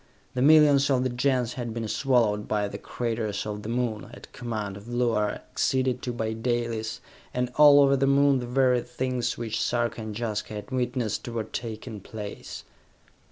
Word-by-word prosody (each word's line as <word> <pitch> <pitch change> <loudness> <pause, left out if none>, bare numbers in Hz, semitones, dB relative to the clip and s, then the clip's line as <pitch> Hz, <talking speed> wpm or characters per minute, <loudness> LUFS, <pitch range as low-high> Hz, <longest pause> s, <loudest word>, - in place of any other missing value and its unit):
The 125 - -1
millions 145 -1 +6
of 130 -2 +2
the 130 - 0
Gens 125 -1 0
had 120 -3 -5
been 115 -1 -3
swallowed 115 -5 +1
by 105 -1 0
the - - -7
craters 115 -4 -3
of 105 -1 -4
the 105 - -6
Moon, 120 -3 -2
at - - -13
command 110 -5 -4
of 100 +2 -11
Luar, 120 -3 +1
acceded 130 +2 -1
to 125 - -3
by 110 -2 -2
Dalis 115 -1 -2 0.3
and 125 0 -1
all 145 -1 +8
over 140 0 +5
the 135 0 +1
Moon 140 -1 +4
the 120 - -5
very 125 -1 +3
things 125 0 -2
which 115 -2 -3
Sarka 120 -1 0
and 110 -1 -6
Jaska 110 -2 -3
had 105 +5 -7
witnessed 125 -4 -2
were 115 -2 -2
taking 110 0 -6
place. 105 +1 -8
120 Hz, 175 wpm, -26 LUFS, 110-130 Hz, 0.3 s, all